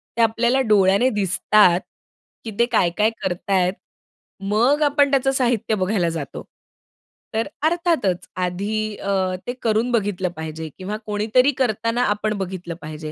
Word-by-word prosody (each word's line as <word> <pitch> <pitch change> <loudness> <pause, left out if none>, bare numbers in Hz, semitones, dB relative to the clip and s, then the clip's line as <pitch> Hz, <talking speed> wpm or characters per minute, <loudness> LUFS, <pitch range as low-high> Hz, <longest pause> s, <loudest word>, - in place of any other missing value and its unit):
त्या 230 - +3
आपल्याला 235 +3 +2
डोळ्याने 200 +4 +4
दिसतात, 195 -2 +3 0.7
की 225 - -4
ते 235 - +5
काय-काय 210 0 +2
करताय 185 0 0 0.8
मग 250 +8 +3
आपण 285 -1 +3
त्याचं 270 0 +2
साहित्य 240 -4 0
बघायला 185 -3 0
जातो. 160 -4 -6 0.9
तर 225 +1 0
अ, 300 +1 -2
अर्थातच, 330 - 0
आधी 205 +4 -2
अ, 190 -2 -1
ते 245 - -2
करून 225 +2 +1
बघितलं 200 -5 0
पाहिजे 160 0 -6
किंवा 200 +3 -4
कोणीतरी 215 +6 +2
करताना, 230 -1 0
आपण 210 +1 0
बघितलं 180 -3 -5
पाहिजे 155 0 -7
210 Hz, 135 wpm, -21 LUFS, 185-235 Hz, 0.9 s, ते